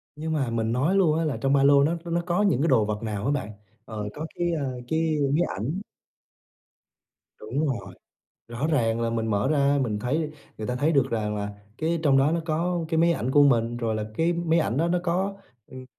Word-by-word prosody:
Nhưng 160 +1 -3
mà 135 -6 0
mình 115 -1 -1
nói 145 +11 +1
luôn 165 -5 +3
á 165 - 0
là 150 - -1
trong 135 0 +2
ba 140 -1 +4
lô 140 0 +6
nó 165 +3 +1
nó 170 0 0
có 175 +2 +1
những 190 -10 +2
cái 165 - +2
đồ 115 -8 +4
vật 105 +1 -3
nào 105 -2 -3
á 140 - +1
bạn? 130 -8 -2 0.3
Ờ, 105 -2 -5
có 150 - -5
cái, 175 - -1
ơ, 135 -6 -3
cái 160 +1 0 0.2
máy 160 - +3 0.2
ảnh. 145 - -3 1.6
Đúng 130 +8 -2
rồi, 100 -9 -4 0.6
rõ 120 +5 -2
ràng 115 -7 +1
là 115 0 0
mình 115 -1 -1
mở 105 +2 0
ra 140 -1 +2
mình 105 -5 -1
thấy 150 +7 -1 0.3
người 110 - -4
ta 125 - -2
thấy 145 +5 +1
được 135 -3 +2
rằng 105 -2 -1
là 100 0 -3 0.3
cái 165 +1 0
trong 140 -4 +4
đó 135 +3 +3
nó 170 - 0
có 170 +2 -1
cái 160 -1 0
máy 170 +1 +4
ảnh 125 -4 -2
của 145 +2 +5
mình, 120 -4 +3
rồi 115 -2 -1
là 110 -1 -2
cái 165 +1 +2
máy 170 -1 +1
ảnh 130 -6 0
đó 165 +4 +1
nó 180 +1 +1
có, 185 +3 -1 0.3
ừm, 130 0 -10
140 Hz, 235 wpm, -25 LUFS, 115-165 Hz, 1.6 s, lô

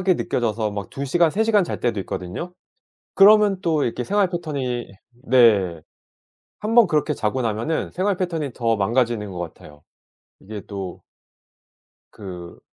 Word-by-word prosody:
느껴져서 110 -2 -1
막 100 -2 -6
2 140 - -4
시간 165 +3 +3
3 220 - +1
시간 215 -3 +3
잘 - - -5
때도 115 -4 -1
있거든요. 95 - -6 0.6
그러면 205 -1 +6
또 160 -6 +1
이렇게 120 +1 -3
생활 200 +2 +1
패턴이 140 - -4 0.4
네 100 -10 +4 0.8
1 215 +2 -2
번 235 -5 +7
그렇게 150 -2 +1
자고 130 0 -2
나면은 115 +8 -2
생활 190 +1 0
패턴이 165 -8 -3
더 115 -2 0
망가지는 110 0 0
것 90 - -8
같아요. 75 -3 -9 0.6
이게 105 +1 -8
또 95 -3 -7 1.1
그 90 -4 -9
125 Hz, 265 characters per minute, -22 LUFS, 105-175 Hz, 1.1 s, 번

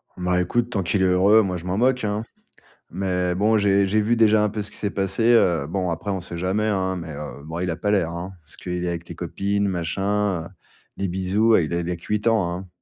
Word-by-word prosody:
Bah, 90 0 0
écoute, 115 +7 0
tant 100 - -1
qu'il 95 +3 0
est - - +4
heureux, 95 +4 +5
moi, 95 -3 -2
je 85 - -9
m'en 90 +1 -1
moque, 130 +2 +2
hein. 105 +1 -1 0.7
Mais 90 -2 -1
bon, 105 +4 +2
j'ai 100 -1 +3
j'ai 105 +3 +2
vu 115 +3 +2
déjà 110 -2 +4
un 105 - +2
peu 105 +1 -4
ce 100 - -7
qui - - -11
s'est 105 - -2
passé, 100 +3 -1
heu. 85 -10 +3
Bon, 90 +2 -2
après, 85 +5 -3
on 95 -2 -2
sait 85 -1 -7
jamais, 95 +5 0
hein, 95 -3 0
mais, 85 -2 -7
heu, 70 -1 -8
bon, 80 +2 -6
il 90 0 -1
a - - -2
pas 100 +4 -1
l'air, 90 -5 +1
hein, 90 +3 -6
parce 80 -1 -16
qu'il 90 -1 -4
est 90 - -1
avec 85 0 -5
les 85 - -8
copines, 100 +4 -1
machin, 95 +1 -1
heu, - - -8 0.5
des 100 - -1
bisous, 95 +5 +1
heu, - - +4
il 80 - -4
a 85 - 0
il 85 0 -3
a 90 - -1
que 85 - -16
8 105 +1 -1
ans, 110 -7 +2
hein. 90 +2 -6
95 Hz, 265 wpm, -23 LUFS, 90-105 Hz, 0.7 s, heureux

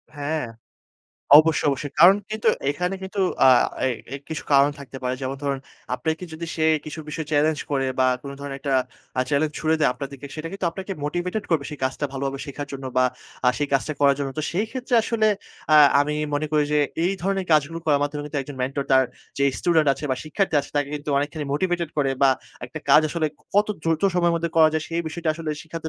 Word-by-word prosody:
হ্যাঁ। 145 -1 -2 0.9
অবশ্যই, 160 0 +3
অবশ্যই। 140 +1 -4
কারণ 185 +4 +9
কিন্তু 215 0 0 0.2
এখানে 180 +6 -2
কিন্তু 195 +1 -4 0.3
আ - - +8 0.4
এ - - +3 0.3
এ - - -2
কিছু 160 - -4
কারণ 140 +1 +6
থাকতে 135 -1 -10
পারে। 125 0 -1
যেমন 135 +1 -3
ধরুন 140 -1 -1 0.4
আপনাকে 160 +5 -2
যদি 165 +1 -6
সে 160 - +1 0.2
কিছু 155 +1 -7
বিষয় 155 +1 -4
চ্যালেঞ্জ 150 +1 +2
করে 135 -2 +1
বা 130 - +4 0.2
কোন 140 - -7
ধরনের 140 -1 -5
একটা 140 -1 -2 0.5
আ - - +5
চ্যালেঞ্জ 150 +1 +1
ছুঁড়ে 160 0 +1
দেয় 150 - +4
আপনাদেরকে, 140 0 -7
সেটা 160 +1 -5
কিন্তু 195 -3 -2
আপনাকে 190 +3 -6
মোটিভেটেড 175 +7 -2
করবে, 155 -4 +2
সেই 150 - -7
কাজটা 130 +3 -2
ভালোভাবে 135 0 -3
শেখার 145 0 -6
জন্য 135 -1 -6
বা 130 - +5 0.4
আ - - +7
সেই 145 -1 -1
কাজটা 140 +3 +1
করার 140 -1 +5
জন্য। 140 -1 -2
তো - - -1
সেই 205 +5 0
ক্ষেত্রে 255 -1 -3
আসলে 220 -1 +1 0.5
আ - - +9 0.2
আমি 150 +1 0 0.2
মনে 155 +1 0
করি 150 -1 +3
যে, 150 - +4 0.3
এই 185 - +2
ধরনের 195 0 -1
কাজগুলো 155 +2 +2
করার 145 -2 +3
মাধ্যমে 145 0 -2
কিন্তু 150 -1 -3
একজন 135 0 -9
মেন্টর, 135 +2 -2
তার 130 0 +6 0.4
যেই 140 0 +3
স্টুডেন্ট 160 -4 +3
আছে 135 +2 -7
বা 130 - +1
শিক্ষার্থী 175 +3 -1
আছে 140 - -12
তাকে 145 -1 +1
কিন্তু 150 0 -7
অনেকখানি 145 +1 -3
মোটিভেটেড 175 +1 -1
করে 135 -2 +2
বা 135 - +7 0.4
একটা 130 - -7
কাজ 150 - +8
আসলে 160 0 -1 0.3
কত 205 +1 +4 0.2
দ্রুত 160 -1 0
সময়ের 175 -1 +3
মধ্যে 170 0 -2
করা 160 -1 +7
যায়, 160 -1 -1
সেই 170 0 -1
বিষয়টা 170 +1 -4
আসলে 160 -1 -4
শিখাতে 160 0 -6
150 Hz, 210 wpm, -23 LUFS, 140-165 Hz, 0.9 s, কারণ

